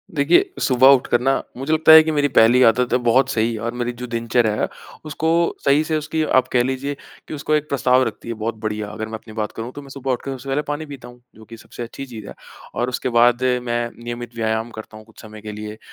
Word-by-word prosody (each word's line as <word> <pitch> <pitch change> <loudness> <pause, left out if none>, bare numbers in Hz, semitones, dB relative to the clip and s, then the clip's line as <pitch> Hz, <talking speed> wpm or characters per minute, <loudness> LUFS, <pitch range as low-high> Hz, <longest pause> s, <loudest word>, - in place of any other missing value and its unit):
देखिए, 165 - +3
सुबह 130 0 +4
उठकर 120 -1 0
ना 135 +2 +1 0.2
मुझे 135 +5 -2
लगता 160 0 +5
है 160 0 +11
कि 160 - -1
मेरी 145 -1 +1
पहली 125 0 +4
आदत 120 +2 +3
है - - +5
बहुत 125 +3 +3
सही 115 +1 0
और 115 +2 -4
मेरी 120 0 -3
जो 125 - -5
दिनचर्या 115 -1 0
है, - - +1 0.4
उसको 155 +1 -2 0.4
सही 140 +3 +4
से 155 0 -1
उसकी 155 +1 -2
आप 130 -4 +2
कह 120 -1 +4
लीजिए 135 +2 -3 0.3
कि - - -7
उसको 150 +1 -2
1 150 0 -1
प्रस्ताव 130 -1 +3
रखती 115 - -8
है 115 - -3
बहुत 110 +1 -4
बढ़िया। 105 -1 -3
अगर 110 +1 -5
मैं 110 - -11
अपनी 110 0 -14
बात 110 -1 -3
करूँ, 115 +2 -7
तो 145 - -9
मैं 140 - -14
सुबह 135 -1 -4
उठ 125 - -2
कर 135 - -5
सबसे 130 +2 -10
पहले 135 +2 0
पानी 150 +1 -5
पीता 140 -5 -10
हूँ। 120 0 -15
जो 110 - -15
कि 115 +2 -12
सबसे 120 - -9
अच्छी 130 +3 -8
चीज़ 110 -5 -10
है - - -8 0.4
और 120 +1 -1
उसके 125 - -3
बाद 120 +1 +3 0.2
मैं 120 -1 -1 0.2
नियमित 120 0 -7
व्यायाम 110 0 -1
करता 110 -1 -10
हूँ 110 - -14
कुछ 115 - -17
समय 110 -1 -12
के 105 0 -7
लिए। 105 0 -8
120 Hz, 255 wpm, -20 LUFS, 115-140 Hz, 0.4 s, है